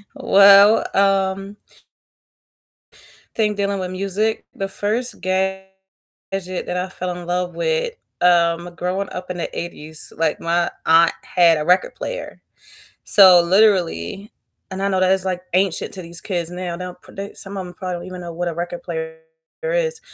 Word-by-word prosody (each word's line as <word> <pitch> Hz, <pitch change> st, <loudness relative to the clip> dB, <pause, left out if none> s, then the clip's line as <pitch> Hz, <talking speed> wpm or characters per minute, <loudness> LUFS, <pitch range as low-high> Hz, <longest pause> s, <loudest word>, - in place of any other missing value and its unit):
Well, 200 Hz, +2 st, +6 dB
um 195 Hz, 0 st, +1 dB, 1.8 s
Think 210 Hz, -2 st, 0 dB
dealing 200 Hz, -1 st, -1 dB
with 180 Hz, -1 st, -3 dB
music. 200 Hz, +4 st, -2 dB
The 195 Hz, -, -3 dB
first 215 Hz, +5 st, -3 dB
gadget 190 Hz, +1 st, -1 dB, 0.7 s
that 185 Hz, -1 st, -4 dB
I 180 Hz, +1 st, -2 dB
fell 180 Hz, -1 st, -5 dB
in 175 Hz, -, -9 dB
love 180 Hz, 0 st, -2 dB
with, 485 Hz, -1 st, -1 dB, 0.3 s
um, 175 Hz, 0 st, +2 dB
growing 185 Hz, +3 st, -2 dB
up 180 Hz, 0 st, -6 dB
in 175 Hz, -, -5 dB
the -, -, -4 dB
'80s, 155 Hz, -2 st, -7 dB
like 160 Hz, -1 st, 0 dB
my 170 Hz, +1 st, 0 dB, 0.2 s
aunt 165 Hz, +1 st, +5 dB
had 170 Hz, -2 st, +4 dB
a 150 Hz, -, -3 dB
record 180 Hz, +1 st, +2 dB
player, -, -, -6 dB, 0.6 s
so 185 Hz, -3 st, +8 dB
literally 190 Hz, -, +1 dB, 0.4 s
and 190 Hz, 0 st, -5 dB
I 200 Hz, -, +1 dB
know 190 Hz, -, 0 dB
that 185 Hz, 0 st, +4 dB
is 190 Hz, -1 st, 0 dB
like 180 Hz, -1 st, -2 dB
ancient 185 Hz, 0 st, 0 dB
to 185 Hz, -, -7 dB
these 170 Hz, 0 st, -8 dB
kids 175 Hz, -4 st, -3 dB
now, 180 Hz, -1 st, -5 dB
they 180 Hz, -, -6 dB
don't 180 Hz, 0 st, -9 dB
produ 200 Hz, +1 st, -9 dB
some 195 Hz, 0 st, -6 dB
of 190 Hz, -, -4 dB
them 180 Hz, -, -11 dB
probably 185 Hz, 0 st, -5 dB
don't 175 Hz, -, -9 dB
even 185 Hz, -1 st, -8 dB
know 170 Hz, -, -7 dB
what 175 Hz, +1 st, -3 dB
a 170 Hz, -, -4 dB
record 175 Hz, +1 st, -5 dB
player 160 Hz, -2 st, -5 dB, 0.4 s
is, -, -, -1 dB
185 Hz, 165 wpm, -20 LUFS, 175-195 Hz, 1.8 s, so